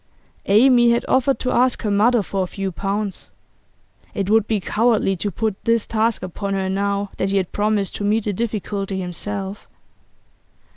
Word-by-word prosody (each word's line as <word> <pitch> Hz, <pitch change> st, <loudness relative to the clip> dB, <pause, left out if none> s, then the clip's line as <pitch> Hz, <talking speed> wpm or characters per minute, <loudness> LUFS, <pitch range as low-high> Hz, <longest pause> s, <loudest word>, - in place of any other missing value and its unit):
Amy 240 Hz, +3 st, +5 dB
had 235 Hz, 0 st, +1 dB
offered 265 Hz, +1 st, +2 dB
to 255 Hz, -, -2 dB
ask 250 Hz, 0 st, +2 dB
her 210 Hz, -, 0 dB
mother 220 Hz, +2 st, +3 dB
for 195 Hz, 0 st, -2 dB
a 185 Hz, -, -1 dB
few 195 Hz, +1 st, -4 dB
pounds; 200 Hz, +2 st, -3 dB, 0.9 s
it 200 Hz, 0 st, -1 dB
would 220 Hz, -1 st, +4 dB
be 220 Hz, -2 st, 0 dB
cowardly 215 Hz, -1 st, +1 dB
to 205 Hz, +3 st, -2 dB
put 210 Hz, +1 st, -3 dB
this 230 Hz, -1 st, +2 dB
task 225 Hz, -1 st, 0 dB
upon 195 Hz, +2 st, -3 dB
her 190 Hz, -1 st, -1 dB
now 200 Hz, +1 st, -1 dB
that 190 Hz, -, 0 dB
he 200 Hz, -, +1 dB
had 185 Hz, -2 st, -1 dB
promised 205 Hz, -2 st, 0 dB
to -, -, -4 dB
meet 210 Hz, +2 st, +1 dB
the 205 Hz, -, -1 dB
difficulty 200 Hz, -2 st, -3 dB
himself. 195 Hz, +2 st, -5 dB
205 Hz, 175 wpm, -21 LUFS, 195-225 Hz, 0.9 s, Amy